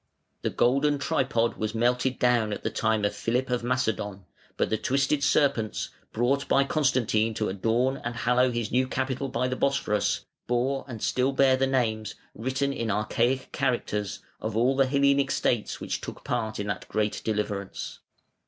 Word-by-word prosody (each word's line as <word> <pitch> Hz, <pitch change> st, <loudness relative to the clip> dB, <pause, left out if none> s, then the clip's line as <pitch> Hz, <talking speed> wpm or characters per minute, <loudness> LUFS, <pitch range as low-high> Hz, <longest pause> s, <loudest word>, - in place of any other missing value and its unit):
The -, -, 0 dB
golden 140 Hz, +4 st, +2 dB
tripod 130 Hz, -4 st, 0 dB
was 110 Hz, +1 st, -2 dB
melted 125 Hz, +3 st, +1 dB
down 120 Hz, -3 st, +2 dB
at -, -, -6 dB
the -, -, -1 dB
time 110 Hz, -2 st, +1 dB
of 105 Hz, -, 0 dB
Philip 125 Hz, +2 st, -1 dB
of 125 Hz, -1 st, 0 dB
Macedon, 110 Hz, -6 st, -1 dB, 0.3 s
but -, -, 0 dB
the 110 Hz, -, +2 dB
twisted 140 Hz, +4 st, +1 dB
serpents, 120 Hz, -7 st, +1 dB, 0.2 s
brought 130 Hz, +5 st, +1 dB
by 140 Hz, -, +4 dB
Constantine 125 Hz, -6 st, +1 dB
to 105 Hz, -, -1 dB
adorn 115 Hz, +7 st, +1 dB
and 120 Hz, 0 st, -5 dB
hallow 125 Hz, +2 st, +3 dB
his 120 Hz, -3 st, -2 dB
new 130 Hz, +2 st, +2 dB
capital 130 Hz, +1 st, -2 dB
by 125 Hz, 0 st, 0 dB
the 130 Hz, -, -2 dB
Bosphorus, 135 Hz, -7 st, 0 dB, 0.2 s
bore 130 Hz, +3 st, 0 dB
and 115 Hz, -5 st, -7 dB
still 130 Hz, +2 st, +1 dB
bear 135 Hz, -1 st, +5 dB
the 135 Hz, +1 st, +1 dB
names, 110 Hz, -5 st, 0 dB, 0.2 s
written 130 Hz, +4 st, -1 dB
in 115 Hz, -5 st, -3 dB
archaic 115 Hz, +5 st, 0 dB
characters, 105 Hz, -7 st, -1 dB, 0.2 s
of 110 Hz, 0 st, -3 dB
all 125 Hz, +4 st, +3 dB
the 135 Hz, -1 st, +3 dB
Hellenic 140 Hz, 0 st, +3 dB
states 120 Hz, -5 st, 0 dB
which -, -, -3 dB
took -, -, -8 dB
part 110 Hz, -3 st, -2 dB
in 100 Hz, -, -2 dB
that 100 Hz, -2 st, -4 dB
great 105 Hz, -1 st, -1 dB
deliverance. 105 Hz, -3 st, -3 dB
125 Hz, 170 wpm, -27 LUFS, 110-135 Hz, 0.3 s, bear